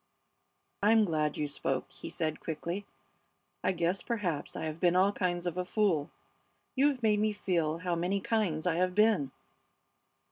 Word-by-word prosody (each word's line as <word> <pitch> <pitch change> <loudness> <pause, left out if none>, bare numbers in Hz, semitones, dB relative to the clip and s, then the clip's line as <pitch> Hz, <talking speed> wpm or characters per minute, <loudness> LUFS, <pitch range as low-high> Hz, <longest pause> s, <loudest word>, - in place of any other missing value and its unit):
"I'm 215 +1 +5
glad 155 -4 0
you 150 - -1
spoke," 135 -2 -2
he - - -8
said, 155 -2 -2
quickly. 170 +5 -4 0.8
"I 185 - +3
guess 180 +1 0
perhaps 185 - -2
I - - -4
have 155 +1 -4
been 175 0 +3
all 190 +2 +5
kinds 175 -3 -1
of 175 0 -2
a - - +1
fool. 180 -6 +1 0.7
You 275 +2 +4
have 265 -4 -1
made 210 -1 +3
me 215 0 +1
feel 170 -6 0
how 175 +1 -2
many 180 +4 0
kinds 190 -7 0
I 175 -2 +1
have 180 0 +1
been." 210 -10 +4
180 Hz, 170 wpm, -31 LUFS, 160-205 Hz, 0.8 s, I'm